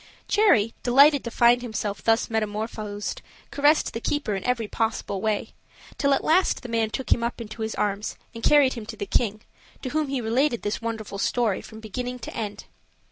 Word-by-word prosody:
Cherry, 240 - +4
delighted 280 +3 +5
to - - -2
find 240 +1 +4
himself 215 -3 -4
thus 225 0 +3
metamorphosed, 215 -1 -3 0.3
caressed 290 +2 +3
the 230 - -4
keeper 280 -6 -1
in 195 - -3
every 250 -3 0
possible 220 -3 -2
way, 215 -1 -1 0.5
till 280 - +2
at - - -3
last 355 -1 +2
the 245 - -7
man 225 -1 +1
took 260 +4 -5
him 235 - +3
up 235 +1 -2
into 220 0 -8
his 220 0 -2
arms 205 0 -2 0.2
and 230 - -8
carried 285 -3 +5
him 225 -4 -7
to 220 - -7
the 200 - -3
king, 215 -1 0 0.4
to 260 - -2
whom 305 +2 0
he 270 -1 -2
related 240 +2 +1
this 205 +1 -2
wonderful 225 -3 -4
story, 225 -1 +1
from 220 0 -11
beginning 245 +4 -4
to - - -8
end. 210 -2 -5
230 Hz, 190 wpm, -25 LUFS, 215-250 Hz, 0.5 s, delighted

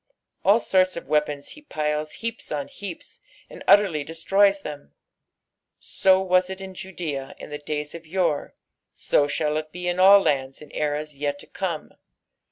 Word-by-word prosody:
All 205 +4 +5
sorts 185 -4 +2
of - - -7
weapons 150 -1 0
he 300 - -9
piles 150 - -2
heaps 230 0 -5
on 145 -2 -3
heaps, 195 -5 -9 0.3
and - - -10
utterly 190 -8 +5
destroys 195 +6 +2
them. 140 - -8 0.8
So 190 -1 +3
was 185 -1 +2
it 190 0 -6
in 190 -1 -8
Judea 170 -8 -5
in - - -10
the 150 - -5
days 150 0 -4
of 170 -1 -10
yore, 170 -4 -1 0.4
so 145 - +1
shall 150 +1 0
it 155 0 -5
be 180 +1 -5
in 175 +1 -1
all 195 +2 +9
lands 135 -5 0
in 150 - -13
eras 150 0 -2
yet 145 0 -1
to - - -12
come. 175 -5 -4
160 Hz, 170 wpm, -24 LUFS, 150-190 Hz, 0.8 s, all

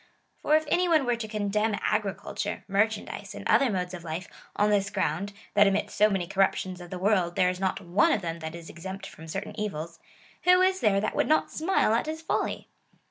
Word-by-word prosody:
For 305 - +3
if 310 0 +2
any 355 +3 +2
one 310 -5 +4
were 245 -1 +2
to 230 -1 -5
condemn 210 0 0
agriculture, 210 -2 -2
mer 200 +2 +3
chandise, 220 -2 -7
and - - -5
other 275 - +4
modes 180 -3 -2
of 175 -2 -7
life, 170 +3 -5 0.3
on 210 0 +2
this 200 -1 +2
ground, 190 +1 -1 0.2
that 205 0 +6
amidst 195 0 0
so 210 +1 +5
many 195 -4 -1
corruptions 185 0 0
of 175 - -10
the 185 - -5
w^orld, 185 -3 +2
there 180 - +3
is 180 - -7
not 190 -1 0
one 175 +2 +2
of 200 - 0
them 165 0 -3
that 160 0 -6
is 170 -1 -9
exempt 190 +3 -7
from 160 - -11
certain 195 +5 -5
evils, 170 -5 -4 0.4
who 360 +1 +5
is 375 0 +2
there 205 -3 +3
that 215 - -2
would - - +2
not 310 - +2
smile 320 - +2
at 230 - +1
his 315 +1 -5
folly - - -2
200 Hz, 220 wpm, -27 LUFS, 180-220 Hz, 0.4 s, that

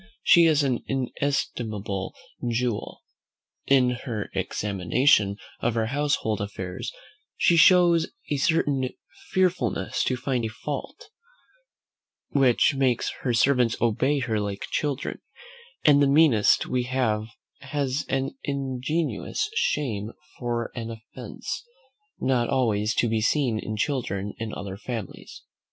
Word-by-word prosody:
she 170 -3 +7
is 150 -2 +3
an 130 -3 0
inestimable 115 -7 -2 0.3
jewel. 120 -2 -2 0.6
In 130 -2 +4
her 120 -4 -4
examination 100 +1 +2 0.2
of 120 -1 0
her 115 -1 +1
household 145 -8 0
affairs 100 +2 -5 0.5
she 170 - +4
shows 170 -1 +6 0.2
a 145 - +2
certain 140 -4 +1 0.4
fearfulness 180 - 0
to 130 - 0
find 125 -1 -1
a - - 0
fault, 145 - -6 1.2
which 135 0 +3
makes 130 -3 +1
her 125 - 0
servants 120 -1 +3
obey 125 +5 +2
her 120 -5 -1
like 100 -1 -3
children: 145 -3 -2 0.6
and 145 -1 +6
the 140 - +5
meanest 140 -7 +4
we 125 - 0
have 115 -4 0 0.3
has 140 0 -2
an 135 - -1
ingenuous 140 - -2
shame 115 - -1 0.3
for 120 -1 -2
an 115 -2 -5
offence, 110 -1 -7 0.6
not 125 -3 +1
always 110 -4 +1
to 120 - +2
be 110 -1 0
seen 120 -1 +1
in 110 0 -4
children 105 -6 -2
in 110 -1 -4
other 100 -2 -6
families. 115 -3 -7
125 Hz, 120 wpm, -25 LUFS, 110-140 Hz, 1.2 s, she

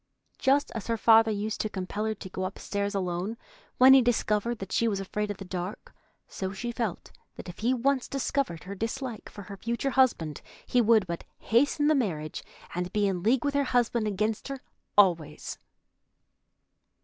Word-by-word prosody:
Just 280 +2 +2
as 225 - -5
her 230 -1 0
father 225 0 +6
used 215 +1 -2
to 215 - -2
compel 200 +2 -3
her 220 0 -1
to 190 - -9
go 185 0 -4
upstairs 200 +2 -3
alone 185 +3 -2 0.4
when 260 +1 +9
he 270 - +8
discovered 235 -1 +1
that 195 -2 -7
she 230 - +2
was 200 -3 0
afraid 210 +2 -3
of 205 - -4
the 195 - -8
dark, 180 +2 -6 0.3
so 190 -1 -4
she 240 +5 -4
felt 230 -6 -4 0.2
that - - -9
if 175 - -9
he 235 +3 +1
once 260 +1 +1
discovered 275 -9 -2
her 195 - -6
dislike 225 +3 -4
for 205 - -10
her 200 +1 -9
future 235 +6 -2
husband 235 - +2 0.2
he 250 - +3
would 220 -3 +4
but 170 -1 -5
hasten 285 +5 +2
the 310 - +5
marriage, 170 - -2 0.3
and 180 +1 -3
be 210 -1 +1
in 185 -3 -1
league 235 +7 +2
with 285 - +1
her 285 0 +2
husband 240 -3 +1
against 215 +2 -1
her 275 -2 -6 0.3
always. 170 -7 +2
215 Hz, 185 wpm, -28 LUFS, 190-245 Hz, 0.4 s, when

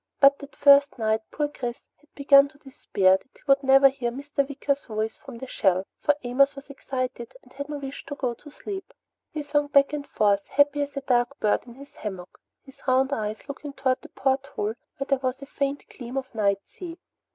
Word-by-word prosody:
But 280 0 +6
that 280 0 -11
first 280 -1 +6
night 220 -1 +1
poor 295 -1 -1
Chris 250 -3 -5 0.2
had 300 - -29
begun 280 0 +6
to 285 0 -20
despair 195 -9 +2
that - - -26
he - - -24
would 275 -1 +5
ever 270 0 +8
hear 260 -3 -3
Mr. 280 +5 -10
Wicker's 280 0 -1
voice 220 -1 -2
from 265 -4 -11
the 265 - -7
shell, 190 -6 +1
for 295 - +3
Amos 275 +3 +3
was 275 0 -10
excited 255 -3 -4
and - - -20
had 280 +1 -6
no 295 - -3
wish 275 -1 -7
to 285 - -5
go 255 -3 -1
to 295 +5 -14
sleep. 385 +6 -7 0.4
He 305 - -4
swung 290 0 +1
back 280 0 +4
and 290 -1 -4
forth, 200 -2 +2
happy 290 0 +3
as 285 0 -4
a - - -1
dark 250 +1 +1
bird 210 +3 +1
in 235 - -11
his 280 +2 -13
hammock, 190 -4 -7 0.3
his 270 0 -17
round 265 +2 +3
eyes 215 -1 -3
looking 285 0 -7
toward 260 -2 0
the - - -12
porthole 265 -5 -1 0.2
where 275 - -3
there 275 -2 +2
was 260 -1 -2
a - - -6
faint 280 0 -2
gleam 250 0 -6
of 260 -1 -4
night 200 -3 +1
sea. 345 -2 -9
275 Hz, 215 wpm, -26 LUFS, 240-285 Hz, 0.4 s, ever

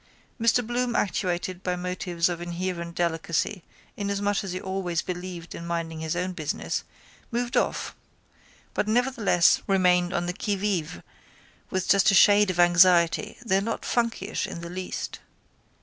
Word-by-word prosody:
Mr 230 +1 +3
Bloom 240 +1 -1
actuated 185 -2 -1
by 180 -1 -1
motives 180 -1 -1
of 175 -1 -3
inherent 175 -1 -4
delicacy 170 +3 -1 0.3
inasmuch 205 0 -1
as 195 - -5
he 185 - -3
always 185 -3 -2
believed 175 -2 -6
in 170 - -7
minding 165 -1 -3
his 160 +1 -2
own 180 +1 -2
business 155 -4 -3 0.5
moved 240 +1 -2
off - - 0 0.8
but - - -1
nevertheless 230 -6 +3
remained 180 -2 +3
on 175 0 -1
the 180 - -2
qui 205 +1 -1
vive 185 - -2 0.7
with 185 -1 -2
just 200 +1 +5
a 195 - +4
shade 205 0 +6
of 180 -1 -2
anxiety 175 +2 +4
though 195 -3 +3
not 225 +3 -3
funkyish 230 -4 -1
in 170 - -7
the 170 0 -7
least. 185 0 -5
185 Hz, 150 wpm, -26 LUFS, 175-205 Hz, 0.8 s, shade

